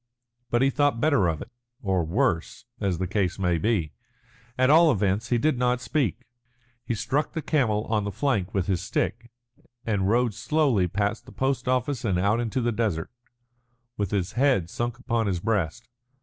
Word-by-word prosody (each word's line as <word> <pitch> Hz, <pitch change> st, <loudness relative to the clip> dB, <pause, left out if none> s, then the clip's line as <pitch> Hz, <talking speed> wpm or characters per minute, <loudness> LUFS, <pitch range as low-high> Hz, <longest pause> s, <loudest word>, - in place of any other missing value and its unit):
But 120 Hz, +2 st, +2 dB
he 135 Hz, -, +3 dB
thought 145 Hz, -3 st, +1 dB
better 140 Hz, -, +3 dB
of 80 Hz, -3 st, -2 dB
it, -, -, -17 dB, 0.3 s
or 95 Hz, -4 st, +1 dB
worse, 85 Hz, -, -1 dB
as 95 Hz, -4 st, 0 dB
the 95 Hz, -, -1 dB
case 95 Hz, -1 st, -1 dB
may 90 Hz, -4 st, +1 dB
be. 95 Hz, -7 st, 0 dB, 0.6 s
At 130 Hz, +2 st, +4 dB
all 165 Hz, 0 st, +7 dB
events, 100 Hz, -2 st, 0 dB
he 120 Hz, -, +3 dB
did 130 Hz, +1 st, +1 dB
not 125 Hz, 0 st, +2 dB
speak. 125 Hz, -, -1 dB, 0.6 s
He 120 Hz, -, -2 dB
struck 140 Hz, +7 st, -1 dB
the 160 Hz, -, -2 dB
camel 120 Hz, -8 st, +1 dB
on 110 Hz, -2 st, 0 dB
the 100 Hz, -, -3 dB
flank 100 Hz, -5 st, 0 dB
with 95 Hz, -3 st, 0 dB
his 90 Hz, -2 st, 0 dB
stick, 120 Hz, +1 st, -2 dB, 0.6 s
and 100 Hz, -4 st, 0 dB
rode 120 Hz, 0 st, +2 dB
slowly 135 Hz, -, +1 dB
past 100 Hz, +4 st, -2 dB
the -, -, -11 dB
post 130 Hz, -1 st, -1 dB
office 130 Hz, 0 st, 0 dB
and 95 Hz, -6 st, +1 dB
out 100 Hz, +5 st, +2 dB
into 120 Hz, +2 st, -1 dB
the 120 Hz, 0 st, +1 dB
desert, 105 Hz, -8 st, -1 dB, 0.8 s
with 100 Hz, -5 st, -2 dB
his 95 Hz, -2 st, -1 dB
head 125 Hz, -10 st, +2 dB
sunk 120 Hz, +1 st, -3 dB
upon 115 Hz, -4 st, -1 dB
his 90 Hz, -3 st, 0 dB
breast. 105 Hz, +2 st, -1 dB
115 Hz, 180 wpm, -26 LUFS, 95-125 Hz, 0.8 s, all